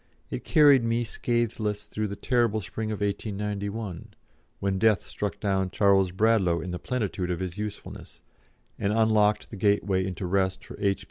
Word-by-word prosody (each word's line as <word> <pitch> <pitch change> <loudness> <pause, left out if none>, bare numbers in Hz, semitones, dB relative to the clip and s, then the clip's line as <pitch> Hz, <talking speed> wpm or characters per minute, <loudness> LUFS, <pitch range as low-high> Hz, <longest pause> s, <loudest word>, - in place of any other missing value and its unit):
It - - -4
carried 145 -5 +6
me 115 +1 +1
scatheless 110 -3 -1
through 105 0 -3
the 100 - -5
terrible 115 -1 +1
spring 110 +2 -4
of 105 - -4
1891, 100 -1 -3 0.4
when 95 -1 -1
death 110 -2 +3
struck 105 -1 -4
down 95 -2 0
Charles 95 -2 +3
Bradlaugh 95 -3 +2
in 90 +3 -5
the 90 - -4
plenitude 95 - -2
of 90 -2 -2
his 95 +1 -5
usefulness, 105 -1 -7 0.6
and 100 - 0
unlocked 110 -1 +2
the 110 - -7
gateway 100 -1 +2
into 90 0 -4
rest 95 0 0
for - - -9
H. 100 -1 +1
105 Hz, 160 wpm, -27 LUFS, 95-110 Hz, 0.6 s, carried